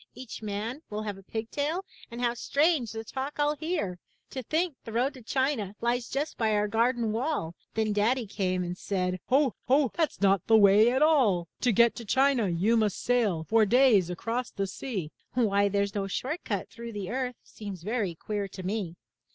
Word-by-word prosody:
Each 255 -3 -8
man 215 +6 -4
will 210 +1 -4
have 205 -2 -5
a - - -13
pig 220 +3 -5
tail, 310 +6 -1 0.2
and 235 0 -8
How 240 -1 +2
strange 280 -1 +1
the 225 0 -5
talk 265 +5 -5
FU 295 0 +2
hear! 310 - -2 0.3
To 260 - -4
think 320 +7 0
the 225 - -8
road 245 +5 +1
to 260 - -12
China 240 -5 -1
lies 240 0 -1
Just 290 +3 -3
by 220 -2 +2
our 210 0 +1
garden 230 +1 +1
wall! 230 - -1 0.2
Then 220 -1 +1
Daddy 230 +4 +1
came 185 -2 -1
and 175 0 -4
said, 185 -1 -2
'*Ho! 270 -1 +3
Ho! 270 0 +3
That's 325 -3 -1
not 195 -2 +3
the 225 - +6
way 210 +2 +6
at 260 +4 +2
all! 230 - +3
'To 250 - +2
get 235 +2 +4
to 235 - -6
China, 260 -1 +3
you 185 +7 +2
must 215 -3 +1
sail 220 -10 +1
For 220 +6 +3
days 215 -5 +4
across 230 +7 -3
the 195 - -2
sea!'' 190 - -5 0.2
— - - -45
Why 200 -4 +2
there's 200 0 0
no 200 -1 -2
short 265 - -3
cut 200 -4 -2
through 235 0 -8
the 205 -1 -5
earth 250 0 -2
Seems 200 -5 -9
very 210 -4 -1
queer 205 +3 -3
to 190 0 -9
me! 190 -3 -3
225 Hz, 200 wpm, -28 LUFS, 200-255 Hz, 0.3 s, the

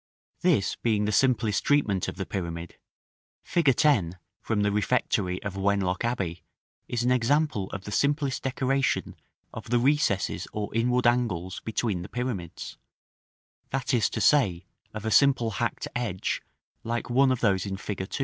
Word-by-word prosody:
§ - - -41
VIII. 180 - +4
This 100 -4 -1
being 105 -3 +1
the 105 - 0
simplest 115 -3 +2
treatment 110 -11 +2
of - - -4
the 95 0 -4
pyramid, 85 -3 -5 0.7
fig. 145 -7 +2
10, 100 - +2 0.2
from 105 -2 0
the 100 - +2
refectory 100 -3 0
of 100 -2 -4
Wenlock 95 -1 0
Abbey, 95 -8 -2 0.5
is 120 -1 -1
an 125 - +2
example 125 -4 +1
of 100 - -6
the 105 - -7
simplest 140 +2 +1
decoration 135 +1 0 0.4
of - - -8
the 120 - +3
recesses 125 -6 +1
or 105 -1 -4
inward 125 +2 +1
angles 115 -7 +1
between 110 -4 -1
the 90 - -8
pyramids; 115 -9 -5 0.9
that 135 0 -2
is 115 -5 +3
to - - -4
say, 100 - +3 0.3
of 110 0 -7
a 110 - -1
simple 120 0 +4
hacked 120 +3 -2
edge 115 -7 -2 0.4
like 120 +1 -3
one 130 +2 +4
of 130 - -1
those 100 -3 +2
in 95 0 -3
fig. 95 -1 -5
110 Hz, 160 wpm, -27 LUFS, 95-125 Hz, 0.9 s, VIII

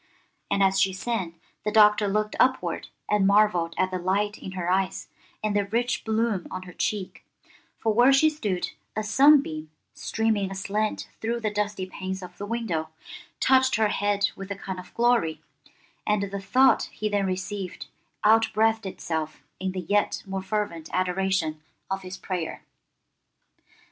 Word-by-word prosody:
And 200 0 +2
as 190 0 +3
she 190 -1 +3
sang, 185 -5 -3 0.2
the 210 - -1
Doctor 210 -1 +5
looked 210 +1 0
upward 260 +1 +1 0.2
and 205 -2 +3
marvelled 200 -5 +3
at 185 0 +1
the 185 - -2
light 200 +3 0
in 190 - -8
her 180 -2 -3
eyes 185 +1 0 0.3
and 210 -1 0
the 205 -1 +2
rich 240 +4 0
bloom 220 -4 0
on 185 0 -5
her 180 -1 -11
cheek, 200 0 -3 0.5
for 220 -1 0
where 245 +4 +6
she 275 +3 +5
stood 210 -13 -2 0.2
a 215 - -1
sunbeam, 220 - +4 0.2
streaming 220 -3 0
aslant 200 +3 -2
through 235 +2 -1
the 215 -2 -1
dusty 205 -2 -1
panes 190 0 -5
of 180 0 -11
the 205 - -4
window, 200 -9 -2 0.5
touched 260 0 +4
her 220 -1 +2
head 205 0 +1
with 195 0 -8
a 200 - -3
kind 190 -1 -6
of 180 - -11
glory, 235 -10 +2 0.7
and 210 -1 +2
the 200 - -3
thought 260 +7 +4
he 215 - -3
then 205 -2 0
received 185 0 -4 0.4
outbreathed 220 0 +3
itself 160 -4 -4 0.2
in 190 0 -2
the 185 0 -4
yet 205 +4 0
more 195 -1 -3
fervent 190 -5 -3
adoration 185 -4 0 0.3
of 195 0 -1
his 185 0 -7
prayer. 180 -3 -4
200 Hz, 160 wpm, -26 LUFS, 185-215 Hz, 0.7 s, where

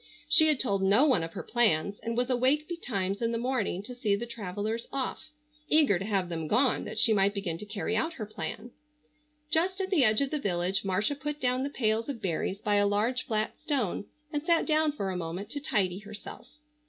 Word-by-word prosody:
She 315 - +7
had 300 -4 +2
told 200 -6 +1
no 200 +9 +5
one 255 - +3
of 165 0 -5
her - - -5
plans, 205 -5 +1
and 230 +1 -4
was 245 0 +2
awake 265 +5 +2
betimes 200 - -3
in 230 0 +1
the 230 - -1
morning 235 -6 -1
to 250 +4 -8
see 220 -5 +1
the 225 +4 -4
travellers 220 0 -4
off, 275 +3 -3 0.4
eager 295 - +4
to 195 - -4
have 195 -4 0
them 165 -2 -4
gone 255 - +2
that - - -7
she 225 - +5
might 200 0 +2
begin 175 -5 -3
to 210 - -7
carry 205 +1 -2
out 325 +9 0
her 230 -9 -5
plan. 220 +2 -6 0.8
Just 365 +5 +1
at 385 0 -2
the 325 -8 +4
edge 215 -2 +4
of 275 - -1
the 305 - -1
village 185 -3 0
Marcia 195 +7 0
put 295 +1 -5
down 255 -1 +1
the 275 - -1
pails 225 -2 0
of 265 -5 -4
berries 190 +1 -2
by 205 -1 +2
a 205 0 +4
large 220 +5 0
flat 215 -1 -1
stone 240 - -1 0.3
and 295 - 0
sat 335 +1 +2
down 310 -1 +3
for 200 -10 -3
a - - -4
moment 180 +5 -5
to 290 - -3
tidy 195 -10 0
herself. 210 0 -10
220 Hz, 220 wpm, -29 LUFS, 200-270 Hz, 0.8 s, She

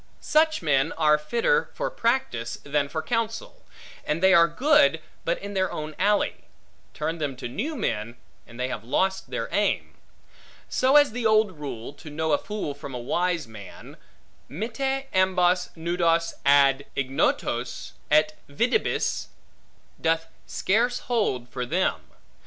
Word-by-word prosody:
Such 315 - +2
men 145 0 +2
are 150 -1 +3
fitter 235 - +1
for - - -2
practice, 230 - -1
than 140 0 0
for 155 +1 -3
counsel; 230 - -3 0.4
and 150 +2 -1
they 190 0 +6
are 170 -2 +7
good, 170 - +4 0.3
but 170 - +1
in 200 +1 -7
their 190 -1 0
own 155 0 -5
alley: 205 +2 +1 0.5
turn 165 +1 -3
them 145 -3 -2
to 125 - -6
new 270 - -3
men, 115 - -2 0.3
and 115 +1 -13
they 125 - 0
have 125 -4 -5
lost 190 +10 0
their - - -3
aim; - - 0 0.7
so 260 +2 +2
as 290 -3 +6
the 235 0 0
old 215 -2 +4
rule, 145 -7 -7
to 155 +2 -12
know 160 +1 -2
a 145 - +3
fool 210 -8 -4
from 140 -2 -8
a - - -2
wise 170 +5 -1
man, 105 -4 -11 0.5
Mitte 265 - -2
ambos 185 -1 +2
nudos 165 0 +1
ad 140 0 +5
ignotos, 135 0 -1 0.2
et 155 +1 +4 0.2
videbis, 235 - 0 0.7
doth 165 0 +1 0.2
scarce 235 +5 +1
hold 205 - -1
for 125 0 -4
them. 175 +9 -1
165 Hz, 145 wpm, -25 LUFS, 140-220 Hz, 0.7 s, are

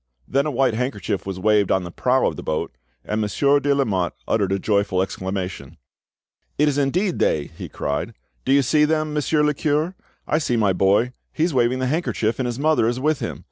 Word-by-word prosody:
Then 140 +3 +1
a - - -1
white 130 -2 +2
handkerchief 105 -6 -2
was 95 -1 -4
waved 105 0 +3
on 95 - +2
the 85 - -7
prow 130 +7 +1
of - - 0
the - - -7
boat, 75 -5 -3 0.3
and 105 +1 -1
Monsieur 140 +7 +2
de 145 0 0
Lamotte 100 -10 0
uttered 100 -4 +1
a 95 - +2
joyful 100 -2 0
exclamation. 95 -5 -4 0.8
"It 150 - +3
is 145 -1 +1
indeed 175 +7 0
they!" 75 -2 +1
he - - -7
cried. 75 +11 -3 0.3
"Do 130 - 0
you 140 0 +5
see 150 +4 +3
them, 155 0 +1
Monsieur 150 0 +1
le 150 0 +2
cure? 155 +5 0 0.3
I 155 - +2
see 125 -6 0
my 105 -4 +3
boy; 100 +7 +2 0.2
he 155 - -1
is 170 -1 +1
waving 125 0 +2
the 130 - -1
handkerchief, 130 -6 -1
and 130 - 0
his 120 -1 -3
mother 150 -5 +2
is 120 +2 -1
with 150 +2 +1
him. - - -4
125 Hz, 215 wpm, -22 LUFS, 100-150 Hz, 0.8 s, you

